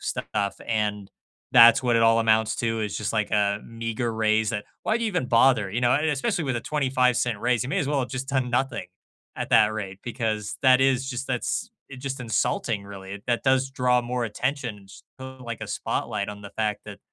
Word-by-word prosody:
stuff 100 -2 -2
and 105 -3 -1 0.4
that's 120 0 +8
what 120 -2 +2
it 115 - +3
all 115 0 +5
amounts 110 -1 +2
to, 115 -2 -1
is 105 -1 -3
just 105 - -2
like 110 -2 0
a 100 -1 +2
meager 115 +1 -3
raise, 110 0 +1
that 105 -3 -3 0.2
Why 220 +2 +1
do 230 - -2
you - - +1
even 180 -9 -1
bother, 115 -4 +4
you 120 +4 -2
know? 120 0 +3
Uh, 145 - +3
especially 145 +4 -1
with 130 -3 -1
a - - -2
25¢ 125 -5 +1
raise, 120 -1 +1
you 130 - -5
may - - 0
as 140 - -1
well 145 -2 +1
have 125 - -3
just 135 0 -4
done 130 -3 0
nothing 125 -6 -1 0.5
at - - -4
that 110 -1 +5
rate, 100 -3 -6
because 110 -4 -3
that 130 -1 +6
is 135 0 +2
just 130 0 -4
that's 130 - -2 0.2
it's 130 -1 -10
just 135 -1 -4
insulting, 115 -3 -1
really. 100 0 -9
That 120 +1 0
does 130 0 +2
draw 125 -2 +2
more 120 0 -2
attention, 115 -3 -3
just - - -14 0.4
like 115 -2 -6
a - - -4
spotlight 105 -3 -2
on 105 0 -8
the 100 - -9
fact 105 -2 -2
that - - -9
115 Hz, 215 wpm, -25 LUFS, 105-130 Hz, 0.5 s, that's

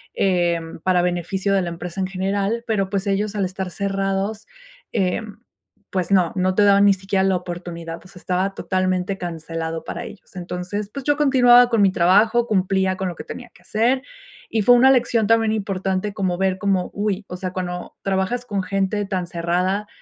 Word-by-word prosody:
eh, 175 -3 +2 0.2
para 180 -1 +3
beneficio 180 +3 -1
de 195 - +3
la 175 - -3
empresa 175 +2 -5
en 185 - 0
general, 195 +4 -1
pero, 205 -5 0
pues, 200 0 -2
ellos 205 +1 -1
al 200 -2 0
estar 185 0 -4
cerrados, 195 +2 -2 0.4
eh, 185 +3 0 0.7
pues 185 0 -2
no, 180 -4 +3
no 185 0 +1
te 205 - +3
daban 200 0 +5
ni 200 -1 +6
siquiera 195 0 -1
la 190 -1 +2
oportunidad, 170 -2 -7
pues, 185 0 -16
estaba 185 +2 -1
totalmente 185 0 -1
cancelado 165 -2 -5
para - - -5
ellos. 195 -1 -12
Entonces, 180 +3 -4
pues, 275 -2 -6
yo 290 - +3
continuaba 245 -4 +6
con 230 -3 +2
mi 195 - +5
trabajo, 215 +7 +4
cumplía 190 -2 +1
con 190 - -2
lo 175 - -4
que - - -8
tenía 245 -1 -9
que - - -21
hacer, 240 +5 +1 0.5
y 220 -2 0
fue 245 +4 +7
una 260 +2 +6
lección 235 -4 +2
también 225 -1 +3
importante 195 -1 -2
como 185 -4 -1
ver 190 -1 +1
como, 190 -2 0
uy, 205 -1 -2
o 180 - -5
sea, 185 0 -5
cuando 180 -1 -5
trabajas 195 +6 -1
con 200 -4 -2
gente 195 +2 -1
tan 185 -3 -3
cerrada 180 +5 -1
195 Hz, 185 wpm, -21 LUFS, 180-205 Hz, 0.7 s, fue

